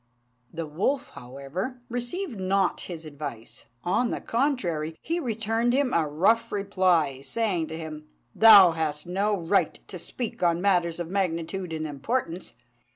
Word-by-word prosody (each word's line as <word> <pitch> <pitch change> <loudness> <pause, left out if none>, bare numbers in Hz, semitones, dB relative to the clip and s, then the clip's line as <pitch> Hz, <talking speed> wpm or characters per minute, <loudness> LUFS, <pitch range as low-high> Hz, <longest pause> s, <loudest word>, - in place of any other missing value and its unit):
The 165 0 -4
wolf, 255 - -1
however, 140 - -6
received 245 - -3
not 190 0 +1
his 165 -3 -7
advice; 145 -6 -7 0.2
on 235 +7 +1
the - - -2
contrary, 180 - -1
he 335 +2 -1
returned 225 -2 0
him 270 -1 +1
a 165 -2 +2
rough 185 +10 +2
reply, 185 -9 +1
saying 185 -1 -1
to 160 - -6
him, 155 -1 -8 0.3
"Thou 205 -5 +9
hast 155 -2 -2
no 200 +4 0
right 175 +4 +1
to - - -8
speak 240 -3 -5
on 170 -1 +2
matters 175 -3 +1
of 170 0 -4
magnitude 180 -1 -2
and 155 -1 -3
importance." 170 - -3
180 Hz, 145 wpm, -26 LUFS, 160-225 Hz, 0.3 s, Thou